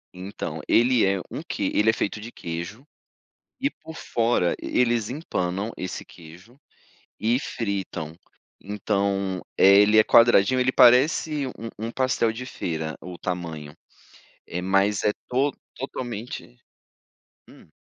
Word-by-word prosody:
Então, 90 -4 -6
ele 120 0 +4
é 95 -1 +1
um - - -5
que - - -3
ele 110 +2 +3
é - - +4
feito 110 -1 -3
de 115 - -8
queijo, 85 - -6 0.8
e 280 - +2
por 160 - -12
fora, 115 - 0
eles 120 -3 +1
empanam 105 - -3
esse 95 - -5
queijo, 90 - -16 0.6
e 115 +3 +2
fritam. 95 - -4 0.4
Então, 100 -2 -1 0.2
eh, 100 +1 +7
ele 105 +1 +4
é - - +7
quadradinho, 115 +2 +5
ele 130 0 +2
parece 140 +4 +4
um 130 - -5 0.4
um - - -5
pastel 130 -3 +1
de 125 +3 -7
feira, 80 -9 -4
o 90 -1 -8
tamanho, 80 -5 -5 0.7
eh, 90 +1 -4
mas 100 +2 +2
é 105 - +2 0.2
to 135 +3 +2 0.2
totalmente 120 - -6 0.9
hum. - - -17
105 Hz, 130 wpm, -24 LUFS, 90-120 Hz, 0.9 s, eh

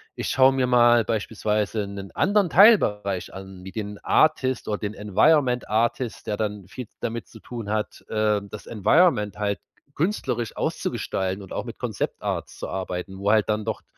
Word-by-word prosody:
ich - - -3
schaue 135 0 +5
mir 130 -1 +1
mal 120 -1 +5
beispielsweise 105 -1 -1
'nen 100 -1 -7
anderen 205 -2 +2
Teilbereich 105 - +4
an, 95 -1 -10
wie 95 - -8
den 105 0 -5
Artist 130 -5 +2
oder 105 -1 -2
den 105 0 -4
Environment 125 +5 +2
Artist, 115 +2 -1
der 105 - -1
dann 105 -3 -3
viel 125 +5 -8
damit 115 0 -4
zu 110 - -14
tun 115 -2 -7
hat, 110 0 -3
ähm, 105 -2 0
das 105 - -9
Environment 105 - +2
halt 100 -1 -1 0.3
künstlerisch 140 - -2
auszugestalten 95 +1 -2
und 95 - -10
auch - - -3
mit - - -8
Concept - - -4
Arts - - -3
zu - - -5
arbeiten.“ 95 0 -5
Wo 100 +1 0
halt 110 -1 +3
dann 105 0 0
doch 110 -1 -3
110 Hz, 170 wpm, -24 LUFS, 100-125 Hz, 0.3 s, schaue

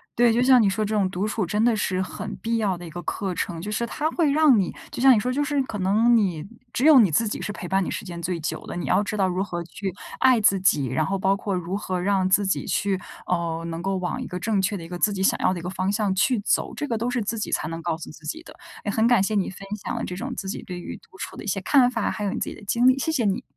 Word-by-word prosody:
对， 240 0 +5
就 235 +2 +2
像 255 -1 +6
你 205 - +4
说 210 +2 -1
这 215 - -3
种 200 -3 +2
独 190 +3 -2
处 215 -1 -1
真 210 +5 0
的 240 -2 +3
是 185 -3 -1
很 205 +2 -4
必 230 0 -1
要 200 -5 0
的 175 - -9
一 - - -8
个 175 - -6
课 190 +2 -3
程。 170 -1 -3
就 205 +5 -5
是 225 - -1
它 300 - -2
会 325 -5 +2
让 290 -5 +5
你 185 - 0 0.2
就 - - -5
像 270 +1 +8
你 215 - +3
说 250 +3 -1
就 290 +2 +1
是 290 -1 0
可 210 -5 -6
能 215 +6 +4
你 180 -8 +1 0.3
只 260 - 0
有 305 -5 +9
你 210 - +5
自 215 +9 +2
己 - - -4
是 - - -3
陪 185 - -7
伴 190 +2 +1
你 - - -3
时 - - -4
间 175 -2 -7
最 170 0 -2
久 155 - -4
的。 - - -6
你 175 - -3
要 190 - +3
知 210 +1 -4
道 195 -2 +2
如 185 +1 -1
何 175 -4 -4
去 190 +3 -5 0.3
爱 260 -2 +5
自 200 -2 +4
己， 150 -7 +3
然 130 +5 0
后 195 +5 -1
包 195 +1 +2
括 200 -1 -3
如 180 +1 -3
何 185 -3 -2
让 190 0 +1
自 200 +2 +3
己 190 - 0
去， 195 -2 0 0.3
呃， 170 -2 -1
能 165 0 -4
够 195 +1 -1
往 180 -1 -3
一 - - -5
个 180 - -5
正 205 +1 0
确 195 +1 0
的 170 - -8
一 - - -8
个 175 0 -6
自 210 - +3
己 190 -1 -2
想 - - +2
要 - - +2
的 185 - -3
一 170 - -9
个 180 - -3
方 190 +1 -1
向 205 -2 0
去 225 +5 +2
走， - - 0
这 295 - -3
个 235 - -1
都 235 +3 -1
是 245 -1 -1
自 220 +2 -3
己 - - -3
才 - - 0
能 165 +1 -5
告 165 -1 -2
诉 165 - -9
自 160 - -15
己 320 - -5
的。 - - -13 0.3
诶， 205 - -1
很 220 +2 +2
感 240 -5 +4
谢 215 - -1
你 200 -3 +1
分 195 +1 -10 0.2
享 - - -3
了 - - -3
这 180 - -5
种 245 +8 -5
自 195 - -5
己 190 - -4
对 180 -1 -7
于 - - -7
独 190 - -20
处 - - -6
的 - - -8
一 - - -8
些 195 0 0
看 255 +4 +4
法， 250 - -1
还 210 - -4
有 200 - 0
你 - - -3
自 - - -2
己 - - -7
的 - - -14
经 235 +5 +3
历， 260 +1 +5
谢 320 - 0
谢 260 -8 0
你。 195 -2 0
195 Hz, 345 characters per minute, -24 LUFS, 180-225 Hz, 0.3 s, 有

